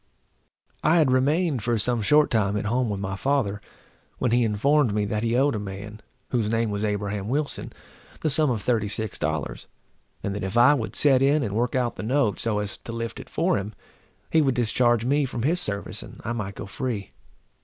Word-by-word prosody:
I 155 Hz, +4 st, +4 dB
had 150 Hz, -6 st, +4 dB
remained 140 Hz, +2 st, +2 dB
for 120 Hz, +2 st, 0 dB
some 120 Hz, +2 st, +2 dB
short 150 Hz, +7 st, +4 dB
time 105 Hz, -3 st, +1 dB
at 105 Hz, -, -3 dB
home 120 Hz, +2 st, 0 dB
with 100 Hz, -2 st, -3 dB
my 95 Hz, 0 st, -3 dB
father, 105 Hz, -4 st, 0 dB, 0.6 s
when 125 Hz, -, 0 dB
he 120 Hz, +1 st, +3 dB
informed 115 Hz, +2 st, +2 dB
me 105 Hz, -1 st, +1 dB
that 105 Hz, +1 st, -2 dB
he 115 Hz, +1 st, 0 dB
owed 140 Hz, +2 st, +3 dB
a 110 Hz, -, -2 dB
man, 105 Hz, +2 st, -7 dB, 0.3 s
whose 115 Hz, -4 st, 0 dB
name 115 Hz, -1 st, 0 dB
was 100 Hz, +1 st, -2 dB
Abraham 105 Hz, -1 st, -2 dB
Wilson, 145 Hz, +3 st, -2 dB, 0.5 s
the 155 Hz, -, +1 dB
sum 150 Hz, +1 st, +4 dB
of 110 Hz, -5 st, -2 dB
thirty 115 Hz, -4 st, +1 dB
six 110 Hz, -1 st, -3 dB
dollars, 80 Hz, -1 st, -3 dB, 0.6 s
and 100 Hz, -, -2 dB
that 100 Hz, -, -4 dB
if 95 Hz, +4 st, -2 dB
I 125 Hz, +5 st, +7 dB
would 120 Hz, -7 st, -3 dB
set 135 Hz, -3 st, +4 dB
in 140 Hz, +2 st, +3 dB
and 105 Hz, -4 st, -3 dB
work 120 Hz, +4 st, 0 dB
out 125 Hz, -2 st, 0 dB
the -, -, -4 dB
note, 120 Hz, -1 st, +1 dB
so 115 Hz, -2 st, +1 dB
as 105 Hz, -1 st, -2 dB
to -, -, -8 dB
lift 115 Hz, 0 st, -5 dB
it -, -, -10 dB
for -, -, +1 dB
him, 100 Hz, +2 st, -7 dB, 0.6 s
he 160 Hz, -, +4 dB
would 135 Hz, -4 st, +1 dB
discharge 120 Hz, 0 st, +2 dB
me 145 Hz, +3 st, +2 dB
from 120 Hz, -3 st, -4 dB
his 165 Hz, +6 st, +2 dB
service, 100 Hz, -6 st, -3 dB
and -, -, -12 dB
I 115 Hz, -, -1 dB
might 100 Hz, -4 st, -4 dB
go -, -, -6 dB
free. 105 Hz, 0 st, -4 dB
115 Hz, 215 wpm, -25 LUFS, 105-130 Hz, 0.6 s, I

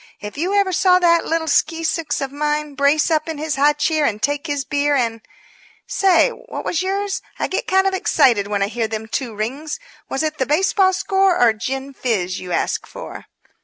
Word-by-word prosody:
If 210 Hz, 0 st, -8 dB
you 360 Hz, +7 st, -1 dB
ever 400 Hz, -2 st, +2 dB
saw 365 Hz, +1 st, +4 dB
that 340 Hz, -2 st, +3 dB
little 325 Hz, 0 st, 0 dB
skeesicks 325 Hz, 0 st, 0 dB
of 270 Hz, -1 st, -3 dB
mine 300 Hz, 0 st, -2 dB
brace 280 Hz, +4 st, +2 dB
up 310 Hz, 0 st, +1 dB
in 320 Hz, -, -4 dB
his 305 Hz, 0 st, -2 dB
high 290 Hz, +2 st, +4 dB
chair 305 Hz, +1 st, 0 dB
and 215 Hz, -7 st, 0 dB
take 290 Hz, +5 st, -1 dB
his 285 Hz, -2 st, -2 dB
beer 290 Hz, 0 st, +1 dB
and 230 Hz, -4 st, -1 dB
But, -, -, -31 dB, 0.6 s
say, 380 Hz, -3 st, +3 dB
what -, -, -8 dB
was 345 Hz, -, 0 dB
yours? 390 Hz, +1 st, -2 dB, 0.2 s
I -, -, -1 dB
get 375 Hz, -, -3 dB
kind 380 Hz, 0 st, +3 dB
of 385 Hz, -, +1 dB
excited 255 Hz, -, +3 dB
when 205 Hz, -1 st, 0 dB
I -, -, 0 dB
hear 225 Hz, +1 st, -2 dB
them 220 Hz, 0 st, -5 dB
two 230 Hz, -1 st, -3 dB
rings 270 Hz, -, -4 dB, 0.3 s
was 270 Hz, -, -1 dB
it 310 Hz, -1 st, -3 dB
the 260 Hz, -, 0 dB
baseball 375 Hz, +5 st, +3 dB
score 385 Hz, -1 st, +2 dB
or 235 Hz, -2 st, +5 dB
gin 265 Hz, +5 st, -5 dB
fizz 195 Hz, -9 st, -2 dB
you 180 Hz, -, -8 dB
asked -, -, -1 dB
for?" -, -, -9 dB
295 Hz, 205 wpm, -20 LUFS, 255-340 Hz, 0.6 s, or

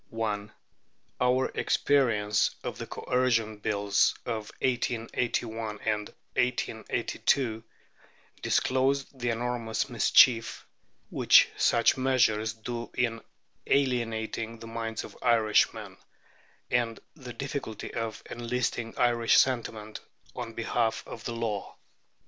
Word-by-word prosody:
Our 125 Hz, +1 st, +3 dB
experience 110 Hz, -7 st, +2 dB
of -, -, -5 dB
the -, -, -5 dB
Coercion 115 Hz, -4 st, 0 dB
Bills 100 Hz, -1 st, +1 dB
of 110 Hz, -3 st, -4 dB
1881 115 Hz, -3 st, -1 dB
and 105 Hz, -1 st, 0 dB, 0.3 s
1882 120 Hz, -1 st, 0 dB, 0.8 s
disclosed 135 Hz, +1 st, +1 dB
the 120 Hz, 0 st, -1 dB
enormous 115 Hz, -1 st, -2 dB
mischief 115 Hz, -3 st, +4 dB, 0.5 s
which -, -, +6 dB
such 115 Hz, +2 st, +3 dB
measures 115 Hz, -5 st, +2 dB
do 115 Hz, +1 st, -6 dB
in 115 Hz, -2 st, 0 dB, 0.5 s
alienating 115 Hz, -4 st, 0 dB
the 115 Hz, -, -11 dB
minds 115 Hz, 0 st, -4 dB
of -, -, -11 dB
Irishmen, 115 Hz, -3 st, +2 dB, 0.7 s
and 120 Hz, -2 st, 0 dB, 0.2 s
the 130 Hz, -6 st, -9 dB
difficulty 135 Hz, -4 st, -5 dB
of 115 Hz, -1 st, -4 dB
enlisting 120 Hz, -1 st, -3 dB
Irish 120 Hz, -2 st, +3 dB
sentiment 110 Hz, -4 st, 0 dB, 0.4 s
on 115 Hz, -, -5 dB
behalf 115 Hz, 0 st, -1 dB
of 110 Hz, -, -9 dB
the 120 Hz, -, -3 dB
law. 110 Hz, -4 st, -3 dB
115 Hz, 95 wpm, -28 LUFS, 110-125 Hz, 0.8 s, which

